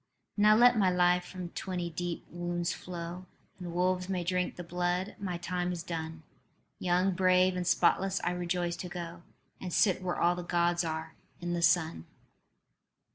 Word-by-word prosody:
"Now 210 0 +6
let 240 0 +6
my 190 -2 +4
life 180 0 +3
from 180 -2 -7
twenty 175 -1 -4
deep 175 +1 -4
wounds 175 0 -2
flow, 180 +1 -7 0.3
And 175 -2 -6
wolves 180 +1 0
may 185 -2 -1
drink 180 +1 -1
the 175 - -6
blood. 175 +2 -1
My 185 -3 -3
time 180 +1 -2
is 170 -2 -4
done. 160 -2 -5 0.6
Young, 180 +1 +2
brave 185 0 +4
and 180 -1 -2
spotless, 195 +2 +3
I 175 - +1
rejoice 175 -1 -1
to 180 - -6
go 170 -1 -6 0.4
And 185 - -5
sit 185 +1 +3
where 180 -1 -2
all 175 +1 +4
the 180 - -5
Gods 175 0 +1
are, 160 -1 -4 0.3
in 175 0 -3
the 170 - -1
sun." 160 - +2
180 Hz, 170 wpm, -31 LUFS, 175-185 Hz, 0.6 s, Now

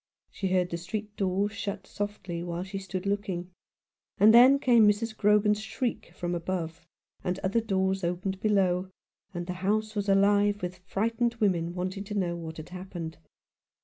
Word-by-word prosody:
She 195 - -3
heard 185 -1 +1
the 170 - -2
street 210 +4 -5
door 195 +1 +1
shut 200 -1 -5
softly 195 -4 -4
while 175 0 -3
she 195 +1 -5
stood 190 0 -5
looking; 195 -3 -2 0.7
and 215 +3 +7
then 255 +4 +8
came 240 -5 +5
Mrs. 220 +2 +1
Grogan's 210 0 +3
shriek 235 +3 -3
from 175 0 -3
above, 170 -1 -4 0.4
and 180 0 -1
other 200 +5 +2
doors 190 -3 0
opened 185 +2 -2
below, 190 -3 +2 0.4
and 175 -2 -4
the 180 - -3
house 215 +2 0
was 205 -1 -2
alive 205 0 +3
with 180 0 -4
frightened 230 +5 -1
women 175 -6 0
wanting 185 +2 -3
to 210 - -5
know 175 -4 0
what 160 -1 -7
had 155 +1 -8
happened. 180 -3 -7
195 Hz, 165 wpm, -28 LUFS, 180-210 Hz, 0.7 s, then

